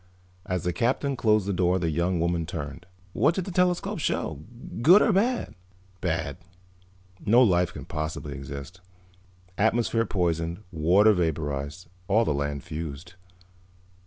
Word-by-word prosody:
As 90 -1 -2
the 90 0 -1
Captain 130 - 0
closed 110 -4 +2
the 100 - -1
door 90 0 +2
the 85 -3 -1
young 85 +3 0
woman 85 -1 0
turned. 75 +1 -6 0.3
"What 160 - +2
did 190 - -2
the 195 - -5
telescope 180 0 +1
show? 80 -2 -2 0.4
Good 175 - +8
or 215 - +3
bad?" 235 +6 +1 0.5
"Bad. 80 -5 -2 0.9
No 120 +5 +5
life 90 -5 +3
could - - -9
possibly 75 -2 -4
exist. 70 +6 -8 0.8
Atmosphere 115 +1 +2
poisoned, 85 0 -1
water 90 +7 +4
vaporized, 80 -2 -2 0.2
all 110 +4 +3
the 75 - +1
land 70 -1 -3
fused." 80 +2 -7
90 Hz, 135 wpm, -26 LUFS, 80-110 Hz, 0.9 s, Good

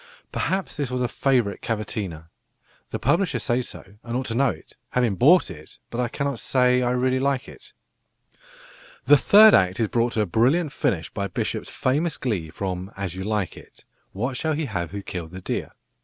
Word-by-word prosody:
Perhaps 190 -2 -2
this 140 -4 -1
was 125 0 -1
a - - +1
"favourite 120 -6 0
cavatina." 105 -7 -4 0.6
The - - -3
publisher 170 -6 +1
says 120 +2 -1
so, - - -9 0.2
and 120 +1 -3
ought 130 - -3
to 115 - -3
know, 120 -9 +1 0.3
having 125 -4 +2
bought 145 - +5
it; 75 -2 -12
but 120 - -2
I 125 - 0
cannot 140 0 -3
say 125 -1 +3
I 125 - +1
really 130 +1 +1
like 135 -1 0
it. - - -13 1.3
The 145 - +8
third 210 +8 +7
act 95 +1 +3
is 110 -3 +1
brought 120 0 +1
to 110 - +1
a - - +2
brilliant 135 - +2
finish 105 - -1
by 100 0 -2
Bishop's 95 - -3
famous 150 +6 0
glee 100 - -2
from 95 +2 -4
As 95 -3 -3
You 95 +1 -5
Like 105 -2 -1
It, - - -16 0.3
"What 120 +7 -3
shall 160 +2 0
he 155 +1 -1
have 95 - -3
who 100 0 -6
killed 85 -3 -6
the 95 - -7
deer?" - - -3
120 Hz, 190 wpm, -24 LUFS, 100-135 Hz, 1.3 s, The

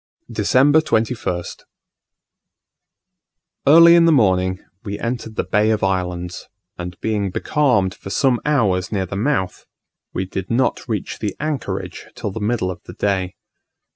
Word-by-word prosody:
December 130 +8 +4
21st. 110 - -2 2.1
Early 165 +3 +8
in 170 -1 +6
the 165 - +5
morning 95 -8 +3 0.3
we 100 -2 -4
entered 115 -2 -4
the - - 0
Bay 105 +1 +2
of 110 -2 0
Islands, 90 -2 -2 0.3
and 90 0 -7
being 105 -3 -1
becalmed 120 -5 +1
for - - -10
some 125 +3 +2
hours 105 -11 +1
near 100 -3 -1
the 95 - -6
mouth, 100 -4 -1 0.4
we 95 - -2
did 95 0 -5
not 125 +2 0
reach 105 -4 -3
the 105 -3 -3
anchorage 150 -2 -4
till 105 - -4
the 110 - -5
middle 105 -3 -1
of 90 -1 -9
the 90 - -9
day. 95 -2 -1
105 Hz, 140 wpm, -20 LUFS, 95-125 Hz, 2.1 s, Early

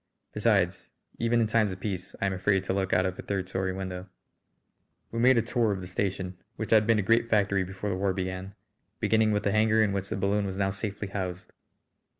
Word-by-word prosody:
Besides, 100 -5 +1 0.3
even 115 0 +2
in - - +3
times 110 -2 +2
of 95 - -7
peace 95 -3 -4
I - - 0
am 100 - +1
afraid 95 +1 +1
to 95 - -1
look 95 -1 -1
out 90 +1 +3
of 95 -1 -3
a - - -2
third 95 -2 -3
story 95 0 -1
window. 95 0 -5 1.0
We 115 - -3
made 130 +1 +5
a 115 - +3
tour 115 -2 +1
of 100 - -2
the 90 - -7
station, 95 0 -3 0.2
which 110 - -5
had 110 -1 +5
been 115 -1 +4
a 105 - +1
great 115 +3 +3
factory 100 -3 +2
before 95 +2 -4
the - - -1
war 95 +1 +1
began, 95 +1 -4 0.4
beginning 110 -1 +3
with 105 0 0
the 100 - +1
hangar 110 +1 +4
in 100 -2 +1
which 100 0 -3
the - - -2
balloon 100 +1 +1
was 95 0 -5
now 95 -1 +1
safely 100 0 -4
housed. 95 -2 -5
100 Hz, 225 wpm, -28 LUFS, 95-110 Hz, 1.0 s, made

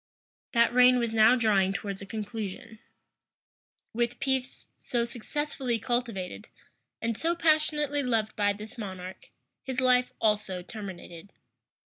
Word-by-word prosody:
That 235 0 +4
reign 250 0 +6
was 235 -2 -1
now 225 +2 +6
drawing 200 -5 +2
towards 200 -1 -4
a 195 - -8
conclusion. 215 0 -6 1.1
With 240 +1 -1
peace, 265 -1 -2
so 235 -1 -1
successfully 255 +1 -3
cultivated, 230 -5 -3 0.6
and 230 0 0
so 335 +8 0
passionately 305 -3 +2
loved 225 -5 0
by 205 -1 +2
this 215 +4 -10
monarch, 185 -3 -7 0.3
his 260 -2 -3
life 250 -1 +3
also 210 -4 0
terminated. 190 -3 -9
230 Hz, 120 wpm, -28 LUFS, 205-250 Hz, 1.1 s, reign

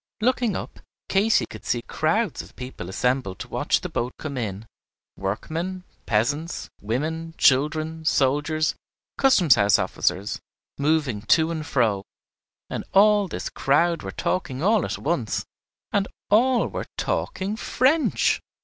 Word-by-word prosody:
Looking 240 -2 +1
up, - - -6 0.3
Katy 205 +3 +3
could 110 -1 -11
see 120 -1 -1
crowds 165 +5 0
of - - -15
people 125 -8 -7
assembled 125 -1 0
to - - -7
watch - - 0
the - - -3
boat 120 +2 -2
come 150 -3 -5
in, 110 -4 -4 0.5
workmen, 165 - -3 0.2
peasants, 145 +10 -1
women, 160 +9 -3
children, 155 +4 +2
soldiers, 155 +2 +2 0.5
custom 200 - +4
house 105 -3 +6
officers, 100 +3 -1 0.4
moving 145 -7 +1 0.2
to 160 +1 0
and 160 -2 -3
fro, 110 -9 +1 0.6
and - - -4
all 205 0 +6
this - - -5
crowd 165 +4 +2
were 95 - -6
talking 140 - -2
all 210 0 +3
at - - -3
once 135 - -1 0.5
and 200 -1 +1 0.2
all 240 +3 +4
were - - -5
talking 195 +3 -2
French! 275 +7 +2
155 Hz, 130 wpm, -24 LUFS, 125-185 Hz, 0.6 s, house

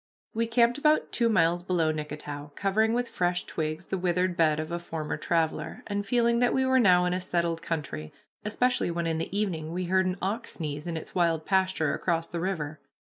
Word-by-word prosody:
We 230 +1 0
camped 235 +3 +3
about 305 +1 +3
two 235 -1 +2
miles 175 -4 +3
below 175 -3 +1
Nicketow, 150 -1 -6
covering 215 +3 +2
with 245 +1 0
fresh 175 -3 -1
twigs 155 +1 -3
the 190 - -3
withered 180 0 +1
bed 155 -2 +3
of 155 +1 -4
a 170 - -2
former 160 -3 -4
traveler, 160 -2 -1
and 205 -1 -2
feeling 235 +2 +2
that 245 0 +3
we 265 0 +2
were 260 0 +4
now 180 -5 +5
in 180 - +1
a 185 - -1
settled 170 -2 -1
country, 145 - -4 0.3
especially 245 +1 +1
when 170 0 -2
in 160 -1 0
the 175 +4 -3
evening 165 -7 -1
we 180 +2 -2
heard 190 +1 +2
an 185 +1 -1
ox 210 +5 -2
sneeze 150 -1 -5
in 165 -1 -2
its 160 - -8
wild 165 -3 +1
pasture 190 -6 +1
across 165 -2 0
the 170 - -5
river. 160 -5 -3
175 Hz, 205 wpm, -28 LUFS, 160-205 Hz, 0.3 s, now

